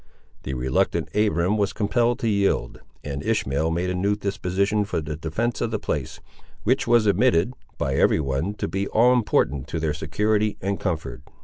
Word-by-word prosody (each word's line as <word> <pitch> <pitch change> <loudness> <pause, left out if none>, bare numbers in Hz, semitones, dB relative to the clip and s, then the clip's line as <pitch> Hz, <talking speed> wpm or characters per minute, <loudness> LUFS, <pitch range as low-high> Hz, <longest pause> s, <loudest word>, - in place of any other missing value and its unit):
The 65 - -4
reluctant 65 +1 0
Abiram 105 -1 +2
was 100 -1 0
compelled 120 +3 +1
to 115 - 0
yield, 100 - 0 0.2
and 70 -1 -4
Ishmael 70 +4 0
made 85 +3 -1
a - - -1
new 100 +3 +1
disposition 100 +1 0
for 100 - -2
the 75 -1 -4
defence 85 +10 -2
of - - 0
the 110 - -1
place; 75 -10 -4 0.4
which - - +1
was 120 -2 +4
admitted, 110 0 +3 0.2
by 65 - -1
every 70 - +3
one, 70 +8 -2
to - - -3
be 95 +4 -2
all 120 +3 +4
important 90 - +1
to 85 - -3
their 80 -1 0
security 105 +8 0
and 100 +1 -2
comfort. 85 -5 -3
100 Hz, 180 wpm, -24 LUFS, 80-105 Hz, 0.4 s, was